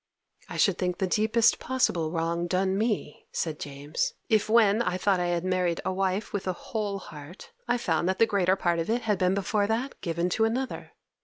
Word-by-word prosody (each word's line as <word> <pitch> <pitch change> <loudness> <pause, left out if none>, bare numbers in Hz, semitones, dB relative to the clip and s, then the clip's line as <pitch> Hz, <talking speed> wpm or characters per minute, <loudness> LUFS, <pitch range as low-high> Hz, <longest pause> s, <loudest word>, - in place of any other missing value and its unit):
'I - - -6
should 195 -4 +3
think 180 -1 -1
the 190 - 0
deepest 220 +4 +3
possible 180 -11 0
wrong 170 +1 -1
done 190 +2 +1
me,' 210 -7 -2
said 155 -2 -3
James, 145 +2 -3
'if, 215 -1 +2
when 220 -1 +5
I 180 -6 0
thought 190 0 +2
I 175 - 0
had 175 0 -1
married 180 -2 0
a 185 - 0
wife 195 +2 -1
with 200 -2 -3
a 185 - +1 0.2
whole 210 -3 -1
heart, 155 -1 -11 0.2
I 245 - +2
found 170 -5 0
that 190 - 0
the 230 - +5
greater 190 -4 +2
part 175 -3 0
of 165 - -2
it 235 +1 0
had 210 -4 0
been 185 0 +2
before 200 +1 0
that 235 +5 -2
given 170 0 -1
to 220 +5 +1
another. 255 +4 -3
190 Hz, 210 wpm, -27 LUFS, 175-215 Hz, 0.2 s, when